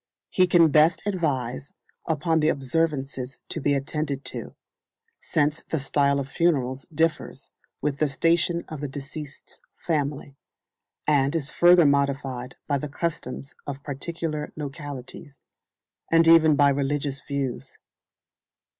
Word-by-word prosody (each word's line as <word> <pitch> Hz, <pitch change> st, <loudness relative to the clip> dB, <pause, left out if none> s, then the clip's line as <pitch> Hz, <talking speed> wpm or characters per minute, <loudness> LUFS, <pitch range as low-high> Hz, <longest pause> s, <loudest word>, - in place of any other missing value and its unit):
He 185 Hz, -1 st, +4 dB
can 170 Hz, -3 st, +5 dB
best 155 Hz, +3 st, +4 dB
advise 140 Hz, -, -2 dB, 0.3 s
upon 160 Hz, +1 st, +1 dB
the 155 Hz, 0 st, +3 dB
observances 135 Hz, -3 st, -1 dB
to 160 Hz, -, -3 dB
be 140 Hz, +1 st, +2 dB
attended 140 Hz, 0 st, -3 dB
to, -, -, -7 dB, 0.6 s
since 150 Hz, -1 st, 0 dB
the 160 Hz, -, -3 dB
style 140 Hz, 0 st, +1 dB
of 135 Hz, -, -3 dB
funerals 135 Hz, -4 st, 0 dB
differs 160 Hz, 0 st, -1 dB, 0.3 s
with 145 Hz, -1 st, -1 dB
the 155 Hz, -, +3 dB
station 170 Hz, +4 st, +1 dB
of 155 Hz, -3 st, -7 dB
the 145 Hz, -, -2 dB
deceased's 145 Hz, +1 st, -9 dB, 0.2 s
family, 145 Hz, -3 st, -2 dB, 0.7 s
and 140 Hz, 0 st, +2 dB
is 150 Hz, -2 st, -2 dB
further 175 Hz, -1 st, +6 dB
modified 135 Hz, -3 st, 0 dB
by 140 Hz, -2 st, +1 dB
the 150 Hz, -, -5 dB
customs 145 Hz, -3 st, -4 dB
of 140 Hz, -1 st, -6 dB
particular 155 Hz, +1 st, -4 dB
localities, 145 Hz, -1 st, -8 dB, 0.7 s
and 165 Hz, 0 st, +5 dB
even 160 Hz, -2 st, +7 dB
by 145 Hz, 0 st, +5 dB
religious 140 Hz, 0 st, -1 dB
views. 140 Hz, -4 st, -4 dB
145 Hz, 125 wpm, -25 LUFS, 135-160 Hz, 0.7 s, even